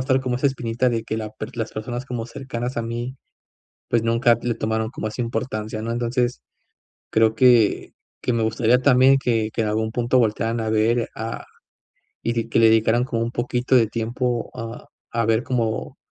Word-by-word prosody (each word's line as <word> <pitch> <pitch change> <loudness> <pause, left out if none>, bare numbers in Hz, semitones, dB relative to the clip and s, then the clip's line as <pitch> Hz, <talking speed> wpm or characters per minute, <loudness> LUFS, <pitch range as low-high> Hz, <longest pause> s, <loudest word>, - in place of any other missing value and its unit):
estar 130 0 +2
como 125 -2 -1
esa 130 - +1
espinita 125 -2 0
de 115 -1 -1
que 110 - -3
la 110 -1 -4
per 110 +2 -8
las 115 -1 -3
personas 120 +3 -5
como 120 -3 -4
cercanas 125 0 -5
a 115 - 0
mí 120 +3 -4 0.7
pues 115 -1 +2
nunca 115 +1 +3
t 120 - -9
le 120 - +1
tomaron 110 +1 -1
como 110 - -4
esa 110 +3 -4
importancia, 110 -2 -3
¿no?, 115 - -3
entonces 120 - -1 0.7
creo 110 0 +3
que 120 -3 +4 0.3
que 125 - 0
me 115 -1 +1
gustaría 115 +2 +3
también 130 0 +5
que 115 -4 0
que - - -2
en 110 - -1
algún 110 +1 0
punto 120 +2 +2
voltearan 115 0 +1
a 110 -1 -1
ver 115 +2 +1
a 115 +1 -5 0.8
y 115 - 0
di 115 -1 -2
que 115 - +1
le 115 - +7
dedicaran 110 +2 +4
como 115 -3 -2
un 115 +1 -2
poquito 125 +1 0
de 115 -4 +5
tiempo 120 +2 -2
a 115 -1 -7 0.3
a 115 -1 +1
ver 115 +1 +2
como 115 -5 -2
115 Hz, 195 wpm, -22 LUFS, 110-125 Hz, 0.8 s, le